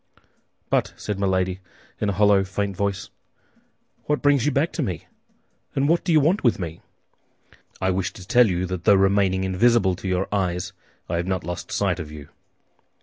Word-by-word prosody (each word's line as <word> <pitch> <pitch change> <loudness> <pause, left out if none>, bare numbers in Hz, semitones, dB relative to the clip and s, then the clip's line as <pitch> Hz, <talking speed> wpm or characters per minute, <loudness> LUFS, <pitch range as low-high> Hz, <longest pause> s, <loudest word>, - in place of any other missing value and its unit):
"But," - - +1
said 105 -2 -4
Milady, 95 -1 0 0.4
in 105 - 0
a - - 0
hollow, 100 0 +4
faint 100 +1 -3
voice, 100 0 -2 0.9
"what 150 0 -1
brings 145 -2 +3
you - - +3
back 145 +5 0
to 170 - -2
me, 95 - -3 0.7
and 140 +1 +2
what 170 +2 +2
do - - 0
you 155 - +6
want 165 +8 +2
with 120 - +3
me?" 85 -3 -6 1.0
"I 95 - +1
wish 95 0 -1
to 95 -2 -12
tell 125 +2 +5
you 90 0 -1
that 90 -1 -5
though 100 - +7
remaining 95 -1 +2
invisible 95 0 +3
to 95 - -6
your 90 +1 0
eyes, 90 -2 -1 0.3
I 85 - -1
have 85 +1 -2
not 95 -1 -1
lost 90 +2 -6
sight - - 0
of 75 -1 -7
you." 75 -1 -10
95 Hz, 185 wpm, -23 LUFS, 90-110 Hz, 1.0 s, though